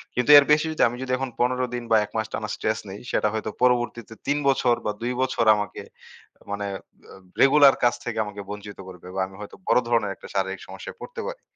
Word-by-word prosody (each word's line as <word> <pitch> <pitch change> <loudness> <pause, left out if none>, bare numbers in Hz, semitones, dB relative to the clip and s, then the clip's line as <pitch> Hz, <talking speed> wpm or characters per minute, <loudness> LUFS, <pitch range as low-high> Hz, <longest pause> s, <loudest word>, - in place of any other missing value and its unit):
কিন্তু 125 +1 0
এর 145 - +7
বেশি 150 +1 +4
যদি 155 - -3
আমি 120 +1 -5
যদি 130 -1 -4
এখন 135 0 -3
১৫ 125 +1 +1
দিন 120 - -4
বা 110 - +6
১ 105 - -18
মাস 110 0 -1
টানা 105 -1 -3
স্ট্রেস 110 0 -1
নেই, 100 - -8
সেটা 105 - +1
হয়তো 110 - -3
পরবর্তীতে 120 -2 +1
৩ 145 - +2
বছর 130 -3 +3
বা - - +1
২ 125 +2 -1
বছর 130 -3 0
আমাকে 105 0 -4 0.7
মানে 100 0 -3 0.8
রেগুলার 140 0 +7
কাজ 120 - +4
থেকে 120 -2 -4
আমাকে 105 -1 -7
বঞ্চিত 105 0 -8
করবে। 90 -1 -12
বা - - -2
আমি 95 - -15
হয়তো 105 - -9
বড় - - +5
ধরনের 115 -4 +1
একটা - - -12
শারীরিক 95 0 -1
সমস্যায় - - -9
পড়তে 485 -1 -7
পারি। - - -7
120 Hz, 215 wpm, -24 LUFS, 105-130 Hz, 0.8 s, এর